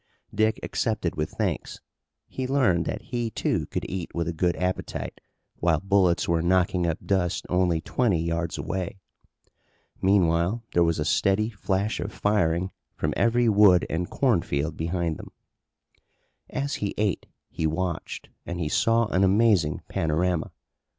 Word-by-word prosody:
Dick 110 Hz, +1 st, +2 dB
accepted 110 Hz, -7 st, -1 dB
with 75 Hz, 0 st, -2 dB
thanks. -, -, -3 dB, 0.5 s
He 130 Hz, -1 st, -4 dB
learned 125 Hz, -12 st, +2 dB
that 105 Hz, -, -4 dB
he, 120 Hz, -1 st, -2 dB
too, -, -, -1 dB
could -, -, -3 dB
eat 90 Hz, -2 st, -4 dB
with 85 Hz, -1 st, -1 dB
a 85 Hz, -, -2 dB
good 85 Hz, +2 st, +1 dB
appetite 90 Hz, 0 st, -3 dB, 0.4 s
while 80 Hz, -3 st, +2 dB
bullets 95 Hz, -2 st, +2 dB
were 85 Hz, -1 st, +2 dB
knocking 90 Hz, 0 st, +2 dB
up 80 Hz, -, 0 dB
dust 90 Hz, -3 st, 0 dB
only 90 Hz, -3 st, +2 dB
twenty 105 Hz, -6 st, +1 dB
yards 85 Hz, 0 st, -2 dB
away. 95 Hz, 0 st, -3 dB, 1.0 s
Meanwhile 95 Hz, +2 st, +2 dB
there 85 Hz, -, +4 dB
was 85 Hz, -1 st, +1 dB
a 75 Hz, -, -1 dB
steady 100 Hz, +7 st, +2 dB
flash 100 Hz, 0 st, -1 dB
of -, -, -4 dB
firing 95 Hz, -3 st, +1 dB, 0.2 s
from -, -, -1 dB
every 120 Hz, +1 st, +3 dB
wood 100 Hz, -5 st, +6 dB
and 85 Hz, +2 st, -2 dB
cornfield 85 Hz, -, 0 dB
behind 85 Hz, -1 st, -2 dB
them. -, -, -11 dB, 1.2 s
As 140 Hz, +2 st, -2 dB
he 100 Hz, -, -2 dB
ate 105 Hz, -4 st, 0 dB, 0.2 s
he 80 Hz, -, -1 dB
watched 85 Hz, +1 st, -3 dB
and 85 Hz, +1 st, -5 dB
he 80 Hz, -3 st, -1 dB
saw 115 Hz, +7 st, +3 dB
an 95 Hz, -, +2 dB
amazing 95 Hz, -6 st, +3 dB
panorama. 80 Hz, +2 st, 0 dB
90 Hz, 145 wpm, -26 LUFS, 85-105 Hz, 1.2 s, wood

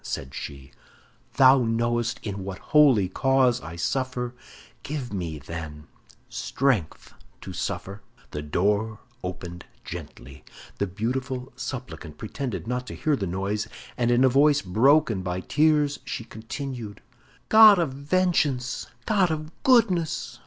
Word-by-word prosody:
said 65 Hz, +2 st, -5 dB
she, 70 Hz, -1 st, -8 dB, 0.6 s
"thou 130 Hz, 0 st, +7 dB
knowest 120 Hz, +1 st, 0 dB
in 100 Hz, -2 st, -4 dB
what 95 Hz, -1 st, -5 dB, 0.2 s
holy 135 Hz, -11 st, +6 dB
cause 130 Hz, +4 st, +2 dB
I 80 Hz, +1 st, -8 dB
suffer; 125 Hz, +5 st, -2 dB, 0.5 s
give 135 Hz, -6 st, -5 dB
me, 85 Hz, -5 st, -3 dB
then, 75 Hz, 0 st, -8 dB, 0.4 s
strength 125 Hz, -, -1 dB, 0.3 s
to -, -, -8 dB
suffer." 100 Hz, +2 st, -4 dB, 0.3 s
The 75 Hz, -, -4 dB
door 105 Hz, +8 st, 0 dB, 0.3 s
opened 90 Hz, -1 st, -6 dB, 0.2 s
gently; 70 Hz, +2 st, -9 dB, 0.4 s
the 100 Hz, -, +1 dB
beautiful 125 Hz, +6 st, -3 dB
supplicant 125 Hz, -, -7 dB
pretended 120 Hz, -, -5 dB
not 125 Hz, +2 st, -3 dB
to -, -, -6 dB
hear 155 Hz, -2 st, +1 dB
the 100 Hz, -7 st, -3 dB
noise, 100 Hz, +4 st, -2 dB, 0.3 s
and 120 Hz, -2 st, +1 dB
in 120 Hz, +1 st, +4 dB
a -, -, +7 dB
voice 145 Hz, +3 st, +4 dB
broken 115 Hz, +3 st, +3 dB
by 90 Hz, 0 st, -3 dB
tears, 150 Hz, -, +2 dB
she 125 Hz, -3 st, -5 dB
continued: 115 Hz, -1 st, -7 dB, 0.5 s
"God 215 Hz, -2 st, +9 dB
of 165 Hz, -7 st, 0 dB
vengeance! 140 Hz, -4 st, 0 dB, 0.2 s
God 200 Hz, -5 st, +3 dB
of 155 Hz, 0 st, -4 dB
goodness! 205 Hz, -, +2 dB
120 Hz, 130 wpm, -25 LUFS, 95-140 Hz, 0.6 s, God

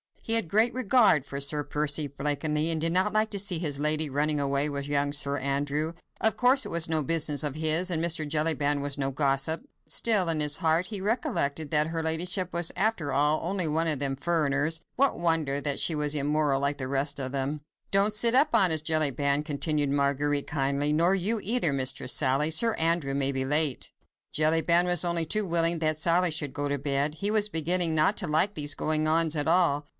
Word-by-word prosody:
He 225 Hz, -, +1 dB
had 225 Hz, -6 st, +3 dB
great 220 Hz, +7 st, +1 dB
regard 220 Hz, -, +2 dB
for 140 Hz, 0 st, -6 dB
Sir 145 Hz, +1 st, 0 dB
Percy 150 Hz, +1 st, -2 dB
Blakeney, 150 Hz, +3 st, -2 dB
and 160 Hz, -, -1 dB
did 165 Hz, +1 st, -1 dB
not 185 Hz, +3 st, +1 dB
like 215 Hz, 0 st, 0 dB
to 200 Hz, -, -1 dB
see 190 Hz, -4 st, 0 dB
his 145 Hz, -4 st, -2 dB
lady 155 Hz, 0 st, +2 dB
running 150 Hz, +2 st, -1 dB
away 140 Hz, +1 st, 0 dB
with 140 Hz, -1 st, -5 dB
young 145 Hz, 0 st, 0 dB
Sir 140 Hz, -1 st, 0 dB
Andrew. 145 Hz, +3 st, -2 dB, 0.3 s
Of 220 Hz, -, +3 dB
course, 255 Hz, +2 st, +2 dB
it -, -, -7 dB
was 170 Hz, -1 st, -3 dB
no 160 Hz, -2 st, -1 dB
business 150 Hz, -1 st, +1 dB
of 145 Hz, -2 st, -3 dB
his, 160 Hz, +4 st, +1 dB
and 165 Hz, -1 st, -1 dB
Mr. 165 Hz, -2 st, 0 dB
Jellyband 145 Hz, -2 st, 0 dB
was 140 Hz, 0 st, -5 dB
no 135 Hz, -1 st, -2 dB
gossip. 140 Hz, +3 st, 0 dB, 0.3 s
Still, 205 Hz, -7 st, +3 dB
in 160 Hz, -2 st, +1 dB
his 150 Hz, 0 st, +2 dB
heart, 165 Hz, +1 st, 0 dB
he 205 Hz, -2 st, -5 dB
recollected 160 Hz, -, -1 dB
that 150 Hz, 0 st, +2 dB
her 165 Hz, 0 st, -4 dB
ladyship 175 Hz, +3 st, -1 dB
was 170 Hz, -1 st, 0 dB
after 190 Hz, -7 st, -1 dB
all 150 Hz, +3 st, 0 dB
only 185 Hz, -2 st, -1 dB
one 160 Hz, +2 st, 0 dB
of 150 Hz, -4 st, +1 dB
them 135 Hz, -1 st, -1 dB
"furriners"; 155 Hz, 0 st, -1 dB
what 275 Hz, -6 st, +1 dB
wonder 160 Hz, -5 st, 0 dB
that 145 Hz, -1 st, -1 dB
she 165 Hz, -, +2 dB
was 150 Hz, -1 st, 0 dB
immoral 145 Hz, -1 st, 0 dB
like 140 Hz, +1 st, -1 dB
the 130 Hz, -, -5 dB
rest 140 Hz, +2 st, -2 dB
of 130 Hz, 0 st, -5 dB
them? 140 Hz, +2 st, -3 dB, 0.3 s
"Don't 200 Hz, +2 st, +2 dB
sit 230 Hz, +2 st, +5 dB
up, 270 Hz, +4 st, +4 dB
honest 175 Hz, -8 st, +2 dB
Jellyband," 145 Hz, -2 st, +1 dB
continued 150 Hz, 0 st, -2 dB
Marguerite, 140 Hz, +1 st, -1 dB
kindly, 140 Hz, 0 st, -1 dB
"nor 170 Hz, +4 st, +2 dB
you 205 Hz, +4 st, +1 dB
either, 205 Hz, -, 0 dB
Mistress 135 Hz, 0 st, -1 dB
Sally. 140 Hz, +2 st, +1 dB
Sir 225 Hz, +8 st, +1 dB
Andrew 165 Hz, -4 st, 0 dB
may 140 Hz, 0 st, -1 dB
be 130 Hz, 0 st, -2 dB
late." 145 Hz, 0 st, +1 dB, 0.4 s
Jellyband 160 Hz, +3 st, +2 dB
was 175 Hz, -1 st, +1 dB
only 170 Hz, -1 st, 0 dB
too 210 Hz, +6 st, 0 dB
willing 170 Hz, -1 st, +2 dB
that 155 Hz, -1 st, 0 dB
Sally 170 Hz, +2 st, +2 dB
should 145 Hz, -3 st, -3 dB
go 145 Hz, 0 st, -3 dB
to 145 Hz, -, -2 dB
bed. 140 Hz, +2 st, -1 dB
He 200 Hz, +5 st, -1 dB
was 210 Hz, -1 st, +1 dB
beginning 170 Hz, 0 st, 0 dB
not 160 Hz, +6 st, +2 dB
to 185 Hz, -, -1 dB
like 160 Hz, +7 st, +1 dB
these 145 Hz, -4 st, 0 dB
goings 155 Hz, 0 st, 0 dB
on 165 Hz, +1 st, +3 dB
at 145 Hz, 0 st, -2 dB
all. 160 Hz, -5 st, +1 dB
155 Hz, 210 wpm, -26 LUFS, 145-170 Hz, 0.4 s, sit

